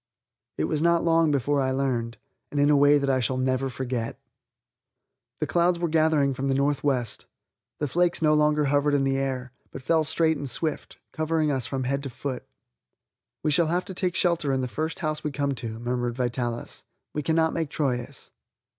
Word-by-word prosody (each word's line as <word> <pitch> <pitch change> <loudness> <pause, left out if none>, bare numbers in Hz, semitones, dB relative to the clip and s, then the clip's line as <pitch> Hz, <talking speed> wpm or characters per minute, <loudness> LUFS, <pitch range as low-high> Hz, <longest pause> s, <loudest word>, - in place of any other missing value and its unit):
It 75 - 0
was 150 - 0
not 170 0 +3
long 165 -1 +3
before 145 0 +1
I 130 - +1
learned, 130 -4 -1 0.3
and 145 - -2
in 145 +1 +4
a - - +5
way 145 +1 +6
that 140 -1 -1
I 130 -1 +2
shall 130 +1 -1
never 130 +1 0
forget. 125 -2 -4 1.2
The 155 - 0
clouds 170 +3 +2
were 170 0 -1
gathering 155 -3 +2
from 130 +1 -3
the 135 - +1
northwest. 140 -3 0 0.5
The 150 - -1
flakes 175 +5 +1
no 155 -1 +3
longer 150 0 +3
hovered 145 +1 +2
in 140 - +2
the 135 0 +1
air, 130 -2 -3 0.2
but 130 - -9
fell 160 +2 +2
straight 160 0 +1
and 140 -1 -5
swift, 155 +5 -3
covering 155 -1 0
us 130 -4 -1
from 135 -1 -2
head 140 +2 -1
to 140 - -5
foot. 130 +1 -5 1.0
"We 155 - +1
shall 165 +2 +4
have 175 +3 0
to 190 - -7
take 180 -1 -1
shelter 170 -5 +2
in 135 -1 0
the 130 - -2
first 155 +8 -3
house 155 0 -1
we 150 - -1
come 140 0 -1
to," 115 -3 -5
murmured 120 0 -2
Vitalis; 120 -1 -3 0.3
"we 150 - -2
cannot 160 +2 +1
make 160 -3 -2
Troyes." 135 -3 -3
140 Hz, 195 wpm, -26 LUFS, 130-155 Hz, 1.2 s, way